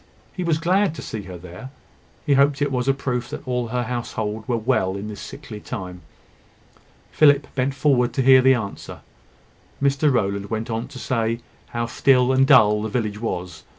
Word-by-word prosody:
He 185 - -4
was 165 -3 +1
glad 180 +2 +1
to 140 - -7
see 110 - -5
her 90 - -7
there; 90 +8 -10 0.6
he 145 - +3
hoped 140 +1 +3
it 145 -1 0
was 125 -1 -1
a 135 - +4
proof 125 -3 -3
that - - -8
all 125 -1 -1
her 125 +2 -2
household 110 -3 -4
were 120 - 0
well 110 -5 0
in 105 +2 -6
this 105 - -8
sickly 105 -2 -9
time. 90 -3 -7 1.1
Philip 145 -2 +4
bent 135 +1 -1
forward 130 -4 +2
to 135 - 0
hear 130 0 +7
the 130 0 +5
answer. 105 -5 -6 0.8
Mr 140 +1 +2
Rowland 100 -4 -1
went 110 +1 -3
on 115 +2 -3
to - - -11
say 115 -2 -1 0.3
how 120 0 -3
still 125 +2 +3
and 135 0 +4
dull 105 -7 +5
the 110 - -3
village 105 -2 -3
was. 90 -7 -4
125 Hz, 185 wpm, -22 LUFS, 110-135 Hz, 1.1 s, hear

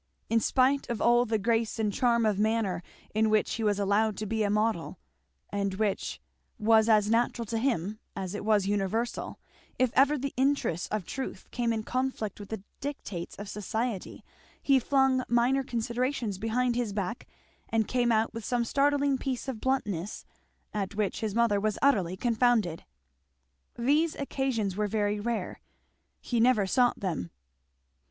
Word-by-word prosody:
In 230 - +4
spite 265 +4 +2
of 235 -2 -2
all 240 +1 +4
the 220 -1 0
grace 225 +2 0
and 215 -2 0
charm 235 -1 +2
of 210 -2 +1
manner 215 -5 +1 0.3
in 220 +1 +2
which 215 0 +2
he 225 - -2
was 205 -2 +2
allowed 205 +1 +1
to 215 - -3
be 220 +1 -1
a 205 - +2
model, 210 -4 0 0.5
and 200 -1 -1
which 205 -1 -1 0.4
was 220 0 +4
as 210 -2 +5
natural 235 0 +1
to 225 +1 -2
him 215 -5 -1 0.2
as 190 -1 -4
it 210 - -4
was 210 -2 +3
universal, 205 +4 -1 0.4
if 255 -2 +2
ever 285 +3 +4
the 275 +1 -3
interests 265 - +1
of 210 -4 -3
truth 265 +7 -6
came 240 -2 0
in 220 -1 -1
conflict 255 -5 -2
with 205 - -9
the 220 -3 -5 0.2
dictates 235 -11 -5
of 205 - -8
society 210 +1 -3 0.4
he 275 -2 +4
flung 265 0 +2
minor 245 +3 +3
considerations 235 -3 -2
behind 240 +3 0
his 235 -4 -1
back 200 +2 -3 0.4
and 220 -2 +1
came 245 -1 +1
out 220 0 +2
with 230 - -6
some 240 +2 0
startling 280 +1 +2
piece 265 -1 -3
of 250 -5 -4
bluntness 210 -8 -2 0.5
at 200 -2 -3
which 210 -2 -1
his 215 -2 -3
mother 230 -3 +3
was 215 0 -1
utterly 190 -10 +2
confounded. 225 -7 +1 0.9
These 295 +7 +2
occasions 260 -8 -1
were 210 +1 0
very 205 0 0
rare; 230 +2 -3 0.6
he 240 - -1
never 230 -3 +4
sought 245 +5 +2
them. 165 - -2
225 Hz, 160 wpm, -29 LUFS, 205-250 Hz, 0.9 s, as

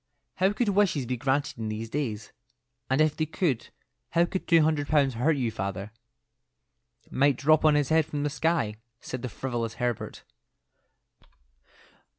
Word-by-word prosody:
How 190 +2 +3
could 210 +1 0
wishes 195 -9 +2
be 125 +1 -2
granted 135 +1 -1
in 110 -1 -3
these 110 +1 -4
days? 115 -8 -3 0.6
And 130 +3 +3
if 155 -1 +3
they 155 - -1
could, 155 -6 -1 0.4
how 170 0 +3
could 185 +2 -4
two 165 -3 +5
hundred 150 -2 +1
pounds 140 -4 +3
hurt 140 +7 +1
you, 120 -4 0
father?" 100 0 -4 1.2
"Might 140 -1 +3
drop 155 +3 +4
on 155 -1 +5
his 145 -2 +1
head 160 -1 +3
from 145 -2 -3
the 150 - -1
sky," 150 -8 0 0.2
said 130 -1 -6
the 125 - -4
frivolous 115 0 -3
Herbert. 120 -3 -3
140 Hz, 160 wpm, -27 LUFS, 120-155 Hz, 1.2 s, two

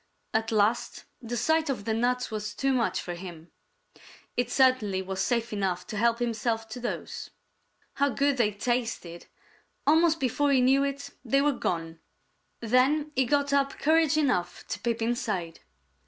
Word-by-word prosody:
At 225 +1 0
last 215 +1 +1 0.2
the 240 0 -4
sight 315 +6 +1
of 245 -7 -3
the 220 - 0
nuts 245 +2 0
was 210 -1 -4
too 270 +3 +1
much 245 -3 +1
for 175 - -5
him. 175 -2 -10 0.8
It 245 -1 0
certainly 250 -7 +3
was 190 0 -3
safe 235 +2 0
enough 190 -3 -1
to - - -7
help 230 +2 +2
himself 230 -1 -1
to 220 - -6
those. 245 - -5 0.6
How 280 +1 +2
good 280 +1 +1
they 220 -4 +2
tasted! 215 -6 -3 0.6
Almost 320 +2 +4
before 280 +2 +1
he 270 - +4
knew 265 +2 +4
it, 280 0 -4
they 275 +3 +2
were 295 - +3
gone. 165 -7 -3 0.6
Then 265 +6 +2
he 260 0 +3
got 285 +2 +1
up 275 -1 +1
courage 315 0 +3
enough 215 -13 0
to - - -3
peep 230 -1 -1
inside. 210 -8 -2
240 Hz, 160 wpm, -27 LUFS, 210-275 Hz, 0.8 s, Almost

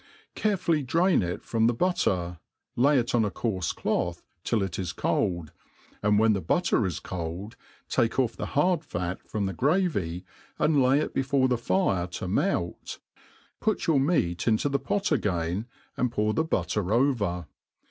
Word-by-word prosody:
*Careful>y'jdra«n 170 - +2
it 90 -1 -3
from 115 -1 +1
the 120 - +1
butter, 90 - 0 0.4
lay 140 +4 +4
it 120 +1 0
on 120 -2 +3
a 105 - +1
coarfe 95 -4 -2
cloth 85 0 -1 0.2
till 110 -4 +1
it 95 -2 -4
is 90 -3 -3
cold, 85 -4 -1 0.5
and 105 0 +3
wb^a.the 110 -3 +3
butter 115 - +1
is 90 - -4
cold, 90 +6 -5 0.3
take 120 -3 +1
ofF 125 -4 +1
the - - -4
hard 175 +3 +3
fa^ 90 - -4
froni 105 -2 -1
the 95 - -2
gravj', 120 - 0 0.3
and 150 -3 +3
Jay 130 +2 +4
it 155 - -2
before, 135 0 +2
the 125 - +2
fire 95 -5 +1
to 90 - -5
melt, 85 0 -1 0.6
put 215 - 0
your 155 -4 +3
meat 135 - +1
into 115 +5 +2
th^e 140 -1 -1
pot 200 +7 0
again^ 95 - 0 0.3
and 125 -2 0
pour 105 -1 0
the 160 - +1
butter 95 - -1
over. 110 - +1
110 Hz, 160 wpm, -27 LUFS, 90-140 Hz, 0.6 s, lay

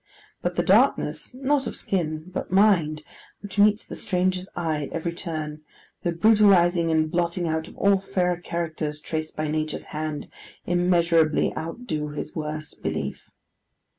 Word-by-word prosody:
But - - -2
the - - +1
darkness—not 270 +1 +2
of - - -4
skin, 155 -5 -2
but - - -3
mind—which 190 +1 0
meets 210 +1 +4
the - - -7
stranger's 185 0 -1
eye 160 -4 -1
at - - -10
every 170 +1 -2
turn; 155 -3 -5 0.4
the 175 - 0
brutalizing 175 -3 +5
and 155 -1 +2
blotting 175 0 0
out 160 0 -1
of - - -14
all 200 -1 +4
fairer 180 -2 0
characters 160 -3 -3
traced 155 0 -4
by 155 0 -2
Nature's 155 0 -2
hand; 155 -1 -3 0.4
immeasurably 170 -3 +3
outdo 160 -3 -4
his 150 0 -6
worst 155 -1 -5
belief. - - -4
170 Hz, 135 wpm, -25 LUFS, 155-185 Hz, 0.4 s, brutalizing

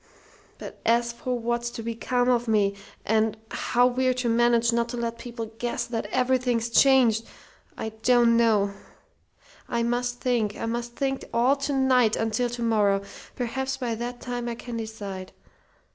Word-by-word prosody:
But - - -9
as 235 +1 +2
for 250 0 -3
what's 240 0 -1
to 235 -1 -7
become 245 +2 -1
of 240 -1 +2
me, 205 -3 +2 0.3
and 220 0 +1
how 245 0 +2
we're 255 0 +2
to 250 -1 -1
manage 235 0 +3
not 235 0 +1
to 245 - -4
let 235 0 -3
people 230 -2 -7
guess 240 0 -2
that 235 -1 -3
everything's 250 -2 +1
changed, 240 -4 +5 0.5
I 220 - -3
don't 230 +1 +3
know! 215 -4 +3 1.0
I 235 -1 0
must 245 +1 -1
think. 235 -5 0
I - - -3
must 235 +1 -3
think 270 -1 -1
all 245 +4 +3
to 280 +1 -2
night, 255 -4 +3
until 225 +2 0
to 240 0 -4
morrow. 205 -3 +2 0.3
Perhaps 265 +2 -2
by 245 -3 -2
that 240 +2 -5
time 245 -1 -4
I 235 - -3
can 240 0 -7
decide. 205 -4 -6
235 Hz, 160 wpm, -26 LUFS, 225-245 Hz, 1.0 s, changed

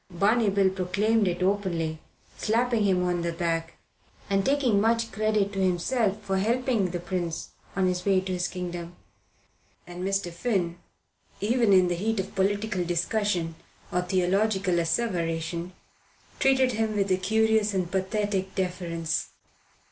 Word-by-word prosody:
Barney 205 +5 +2
Bill 195 -1 +3
proclaimed 200 +3 +1
it 180 0 -1
openly, 175 -5 0 0.4
slapping 230 0 +1
him 185 -2 +2
on 175 -1 0
the 170 0 -1
back 165 -1 -2 0.5
and 195 0 +3
taking 260 -7 +2
much 230 +1 +1
credit 215 -1 0
to 195 - -3
himself 195 +4 +1
for 195 -1 0
helping 230 -2 +1
the 175 0 -3
prince 175 -2 -4 0.2
on 190 0 +2
the 180 -1 0
way 195 -1 +3
to 190 0 -4
his 180 0 0
kingdom. 175 -1 -6 0.9
And 175 +1 -7
Mr. 195 -2 -1
Finn, 180 -4 -1 0.6
even 230 +1 +2
in 185 -2 +6
the 175 - 0
heat 215 +5 -1
of 190 - -4
political 200 0 0
discussion 175 0 0 0.4
or 180 - +1
theological 190 +1 +1
asseveration, 170 -2 -1 0.7
treated 265 -2 +4
him 220 -1 -1
with 200 -1 0
a 185 - +4
curious 220 +1 +2
and 180 -2 -1
pathetic 195 0 -1
deference. 170 -3 -2
190 Hz, 140 wpm, -27 LUFS, 175-215 Hz, 0.9 s, in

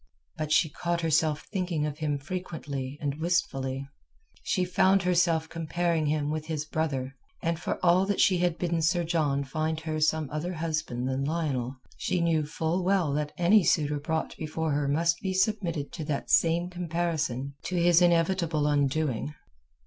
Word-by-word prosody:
But 155 -1 -4
she 160 - +5
caught 170 +3 -2
herself 155 -1 +1
thinking 175 -6 -1
of 150 +1 -4
him 150 -2 0
frequently 145 -4 -5
and 145 +1 -3
wistfully; 135 -6 -1 0.5
she 185 - 0
found 190 +2 +3
herself 170 -3 +2
comparing 165 -1 -1
him 150 0 0
with 155 0 -3
his 155 -2 -2
brother; 140 -5 -2 0.3
and 165 0 0
for - - -2
all 180 +2 +4
that 205 - 0
she 185 -2 +4
had 175 -1 +1
bidden 170 -2 0
Sir 175 +2 +2
John 155 -4 0
find 155 +3 -2
her 155 -1 -3
some 155 0 +2
other 160 +4 -3
husband 155 -6 -2
than 130 +1 -1
Lionel, 140 -5 -1 0.2
she 180 - -1
knew 160 -3 +1
full 160 +3 -1
well 180 -6 +2
that 150 0 -1
any 185 +3 +5
suitor 150 -3 +2
brought 160 +2 -2
before 160 0 -2
her 145 0 0
must 165 +4 +1
be 190 -1 -2
submitted 185 -7 0
to 160 - -5
that 145 -2 -3
same 170 +1 +3
comparison 160 -6 -2
to 185 - -2
his 175 0 +5
inevitable 170 -2 +2
undoing. 145 -1 0
160 Hz, 165 wpm, -28 LUFS, 150-175 Hz, 0.5 s, she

